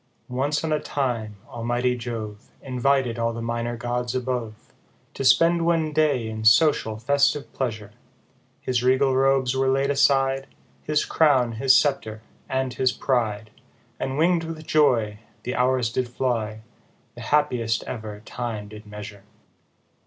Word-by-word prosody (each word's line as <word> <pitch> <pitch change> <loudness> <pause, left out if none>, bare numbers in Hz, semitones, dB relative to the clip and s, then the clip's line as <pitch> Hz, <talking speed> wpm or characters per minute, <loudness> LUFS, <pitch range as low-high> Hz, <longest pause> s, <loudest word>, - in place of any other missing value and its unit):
ONCE 140 +5 -1
on 160 -1 0
a 150 - +1
time, 120 -8 -2
almighty 120 +1 -1
Jove 115 -3 -6
Invited 130 -2 0
all 115 0 0
the 115 - -6
minor 115 0 -3
gods 120 +1 -3
above, 125 -3 -2 0.6
To - - -4
spend 170 +5 +4
one 165 -2 +1
day 145 -7 +2
in 110 0 -5
social 110 -2 +4
festive 140 +4 +1
pleasure; 110 -5 -4 0.7
His 125 -2 0
regal 130 +1 +3
robes 135 -1 +2
were 135 0 +1
laid 135 +1 +2
aside, 135 -1 +2 0.3
His 150 0 0
crown, 135 -7 +3
his 130 +4 +4
sceptre, 110 -7 -1 0.3
and 130 -1 -1
his 130 0 +1
pride: 110 -5 -1 0.5
And 130 +1 -3
wing'd 170 +1 +3
with 160 -1 -7
joy, 115 -10 +2 0.2
The 125 - -3
hours 125 -2 +1
did 125 +1 -2
fly, 115 -4 -2 0.5
The - - -11
happiest 125 -7 +1
ever 110 -3 -7
time 110 -3 -5
did 105 0 -12
measure. 105 -1 -9
125 Hz, 140 wpm, -24 LUFS, 115-135 Hz, 0.7 s, spend